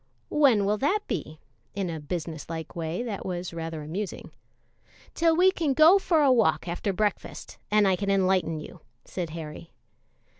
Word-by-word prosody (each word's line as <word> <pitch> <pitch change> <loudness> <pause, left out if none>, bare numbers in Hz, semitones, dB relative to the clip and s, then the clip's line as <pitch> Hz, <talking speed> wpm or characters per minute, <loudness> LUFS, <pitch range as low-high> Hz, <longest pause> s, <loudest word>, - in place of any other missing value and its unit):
"When 260 -9 +4
will 210 +1 +1
that 380 +10 +1
be?" 155 +1 -4 0.4
in 195 -2 -2
a 160 - -5
business 160 0 -5
like 160 -1 -6
way 165 +5 -3
that 220 -5 -5
was 180 -1 -4
rather 165 -2 -5
amusing. 185 +6 -5 0.8
"Till 330 -1 +3
we 370 +2 +6
can 310 -7 -1
go 325 +7 +7
for 325 -5 +2
a 275 - +5
walk 220 -9 +2
after 175 +4 -2
breakfast, 205 +2 -3
and 210 -1 +4
I 190 - +3
can 200 +2 -3
enlighten 185 -4 +1
you," 150 - -10 0.3
said 175 -3 -4
Harry. 160 0 -8
190 Hz, 165 wpm, -26 LUFS, 165-245 Hz, 0.8 s, go